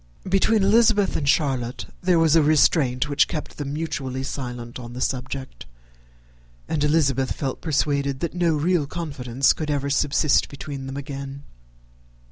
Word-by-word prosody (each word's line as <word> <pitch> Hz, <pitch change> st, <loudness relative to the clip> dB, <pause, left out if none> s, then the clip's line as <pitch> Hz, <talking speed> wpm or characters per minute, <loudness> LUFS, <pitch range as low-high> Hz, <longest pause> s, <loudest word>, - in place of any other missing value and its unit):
Between 195 Hz, +3 st, +3 dB
Elizabeth 210 Hz, 0 st, +4 dB
and 145 Hz, -2 st, 0 dB
Charlotte 130 Hz, -5 st, 0 dB, 0.2 s
there 180 Hz, -1 st, +3 dB
was 165 Hz, -1 st, +4 dB
a 165 Hz, -, +6 dB
restraint 150 Hz, -3 st, +3 dB
which 145 Hz, 0 st, +3 dB
kept 150 Hz, -, -6 dB
them 140 Hz, -1 st, -4 dB
mutually 145 Hz, -5 st, -3 dB
silent 125 Hz, -3 st, -6 dB
on 120 Hz, -1 st, -9 dB
the 125 Hz, -, -7 dB
subject; 130 Hz, -, -4 dB, 1.0 s
and 150 Hz, -2 st, -1 dB
Elizabeth 140 Hz, -4 st, +2 dB
felt 135 Hz, -3 st, -4 dB
persuaded 140 Hz, -3 st, 0 dB
that 170 Hz, -, -2 dB
no 170 Hz, -2 st, +1 dB
real 155 Hz, 0 st, +1 dB
confidence 140 Hz, -6 st, 0 dB
could 155 Hz, -1 st, -5 dB
ever 140 Hz, -1 st, -1 dB
subsist 145 Hz, 0 st, +2 dB
between 140 Hz, -1 st, -7 dB
them 135 Hz, +1 st, -6 dB
again. 140 Hz, 0 st, -7 dB
140 Hz, 145 wpm, -23 LUFS, 135-160 Hz, 1.0 s, a